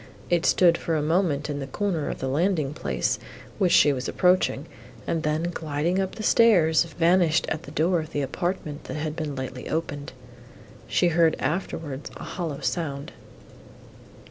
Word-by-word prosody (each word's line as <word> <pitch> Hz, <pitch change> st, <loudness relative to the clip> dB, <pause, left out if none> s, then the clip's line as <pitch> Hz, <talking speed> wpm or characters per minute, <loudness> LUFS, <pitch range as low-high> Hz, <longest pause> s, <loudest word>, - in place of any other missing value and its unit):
It 175 Hz, -1 st, +3 dB
stood 170 Hz, -2 st, +4 dB
for 165 Hz, -, -1 dB
a 155 Hz, -, +1 dB
moment 160 Hz, -3 st, +1 dB
in 145 Hz, -1 st, -3 dB
the 135 Hz, -, -5 dB
corner 170 Hz, +1 st, -2 dB
of -, -, -4 dB
the 130 Hz, -, -2 dB
landing 150 Hz, 0 st, 0 dB
place, -, -, -1 dB, 0.4 s
which 185 Hz, -4 st, +3 dB
she 145 Hz, -4 st, +6 dB
was 130 Hz, -1 st, -4 dB
approaching, 180 Hz, 0 st, +2 dB, 0.4 s
and 165 Hz, -, -1 dB
then, 155 Hz, +3 st, -1 dB
gliding 160 Hz, +4 st, -1 dB
up 190 Hz, -1 st, -2 dB
the 220 Hz, -, -6 dB
stairs, 175 Hz, -10 st, +5 dB
vanished 170 Hz, -1 st, +2 dB
at 155 Hz, -, -2 dB
the -, -, -11 dB
door 165 Hz, +4 st, +2 dB
of 155 Hz, -1 st, -6 dB
the 145 Hz, -, -1 dB
apartment, 155 Hz, +1 st, -3 dB
that -, -, -6 dB
had 155 Hz, 0 st, -3 dB
been 155 Hz, -4 st, -4 dB
lately 130 Hz, -1 st, -6 dB
opened. 145 Hz, -4 st, -3 dB, 0.7 s
She 175 Hz, -, +2 dB
heard 165 Hz, -1 st, +3 dB
afterwards 155 Hz, -4 st, -3 dB
a -, -, -8 dB
hollow 165 Hz, -6 st, -4 dB
sound. 145 Hz, -5 st, -3 dB
160 Hz, 170 wpm, -25 LUFS, 145-175 Hz, 0.7 s, she